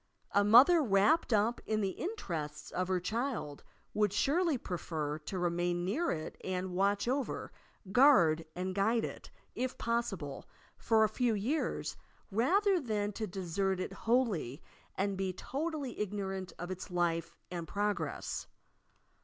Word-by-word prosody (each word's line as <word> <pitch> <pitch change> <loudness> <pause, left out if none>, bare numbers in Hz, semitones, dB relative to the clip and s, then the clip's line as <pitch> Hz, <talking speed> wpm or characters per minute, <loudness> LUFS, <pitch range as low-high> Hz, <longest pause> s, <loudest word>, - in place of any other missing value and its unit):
A 200 - +4
mother, 255 - +7
wrapped 245 +7 +3
up 220 +2 +2
in 215 0 +1
the 195 -2 0
interests 170 - -5
of 185 0 -1
her 185 -1 +1
child, 220 - -3 0.3
would 210 -2 +2
surely 300 - +2
prefer 155 -7 -3
to 160 +5 -5
remain 175 0 0
near 295 - 0
it 155 -1 -4
and 185 0 -3
watch 200 +3 +1
over, 265 +1 -2 0.4
guard 190 - +6
and 185 +1 -2
guide 220 +4 +2
it, - - -8 0.2
if 255 0 -3
possible, 210 -12 -2 0.3
tor 220 -1 +4
a - - +5
few 230 +1 +1
years 255 +10 -1 0.3
rather 370 - +3
than 210 -7 -1
to 215 +1 -4
desert 190 +1 -1
it 190 - -3
wholly 210 - 0 0.3
and 195 0 -1
be 190 -1 -1
totally 285 - -3
igno 205 -1 -3
rant 190 -1 -5
of 175 +2 -5
its 185 +2 -6
life 170 -1 0 0.2
and 170 -2 -4
progress. 205 +4 -2
200 Hz, 145 wpm, -33 LUFS, 180-240 Hz, 0.4 s, mother